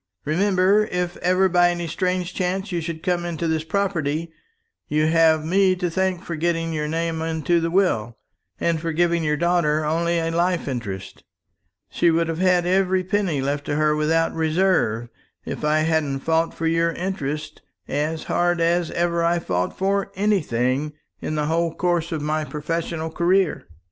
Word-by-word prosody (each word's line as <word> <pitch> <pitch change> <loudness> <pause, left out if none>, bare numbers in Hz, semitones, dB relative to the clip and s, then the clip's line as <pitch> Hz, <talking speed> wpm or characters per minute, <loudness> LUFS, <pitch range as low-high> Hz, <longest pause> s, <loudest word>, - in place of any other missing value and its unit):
"Remember, 190 +5 +3
if 180 0 -2
ever 185 +2 +2
by 175 -1 +4
any 175 -1 -2
strange 180 +2 -2
chance 190 +2 -2
you 175 -1 -1
should 160 0 -5
come 180 -2 0
into 170 -1 -3
this 160 -1 0
property, 165 -3 -1 0.6
you 155 +1 +1
have 160 -1 +3
me 190 +2 +3
to 180 -2 -2
thank 190 0 -1
for 170 - -4
getting 165 +1 -1
your 150 -1 -2
name 165 +1 -2
into 165 +1 0
the 165 - 0
will, 120 - +1 0.4
and 165 -2 0
for 165 -1 -2
giving 170 0 +1
your 150 -1 +1
daughter 155 -2 +1
only 170 +2 +1
a 165 0 -1
life 175 0 0
interest. 110 -8 -5 0.7
She 170 - +2
would 165 0 +1
have 165 0 -3
had 180 -1 +3
every 185 0 +2
penny 185 -6 0
left 145 +1 -1
to 145 - -2
her 150 0 +2
without 160 +2 +1
reserve, 160 - +1 0.4
if - - -5
I 155 +1 +2
hadn't 155 -4 0
fought 165 +2 0
for 165 - -3
your 165 +1 +2
interests 155 -5 -4 0.3
as 155 +2 -2
hard 175 0 +1
as 170 0 +1
ever 170 0 0
I 170 +1 +2
fought 90 - -2
for 195 +1 0
anything 150 - 0 0.3
in 155 - -3
the 150 -1 0
whole 165 +1 0
course 175 -2 0
of 155 -3 -3
my 155 +1 0
professional 160 +2 -3
career." 180 +1 +1
165 Hz, 170 wpm, -22 LUFS, 155-180 Hz, 0.7 s, by